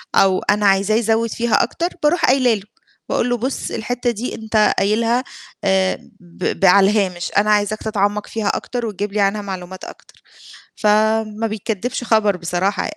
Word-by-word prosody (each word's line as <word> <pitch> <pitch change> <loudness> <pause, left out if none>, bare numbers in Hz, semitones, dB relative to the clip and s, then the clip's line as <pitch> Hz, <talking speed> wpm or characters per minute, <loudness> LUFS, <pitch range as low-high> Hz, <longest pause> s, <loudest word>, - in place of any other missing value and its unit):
أو 190 -1 +4
أنا 205 0 +2
عايزاه 195 +2 +3
يزوِّد 225 0 +1
فيها 235 0 +1
أكتر، 340 - -2 0.2
باروح 320 +4 +3
قايلة 255 -2 +3
له، 205 -3 -4 0.5
باقول 245 - 0
له: 245 - +1
"بُص، 260 +4 -3
الحتّة 245 +2 -2
دي 235 +2 -5
أنت 220 -1 +1
قايلها 230 +4 +1 0.4
آآ 190 -1 +2 0.2
ب 175 0 -5
ب - - +2
على 195 +1 +6
الهامش، 185 -5 -1
أنا 210 +1 +3
عايزاك 210 +1 +1
تتعمَّق 210 -1 -1
فيها 220 -2 -3
أكتر 245 +3 -2
وتجيب 205 -1 -4
لي 210 - -1
عنها 200 +1 +1
معلومات 190 -2 -7
أكتر." - - -14 0.6
فما 215 +1 +1
بيكدِّبش 220 +3 -3
خبر 215 -4 +2
بصراحة. 180 +3 -1
210 Hz, 160 wpm, -19 LUFS, 195-225 Hz, 0.6 s, على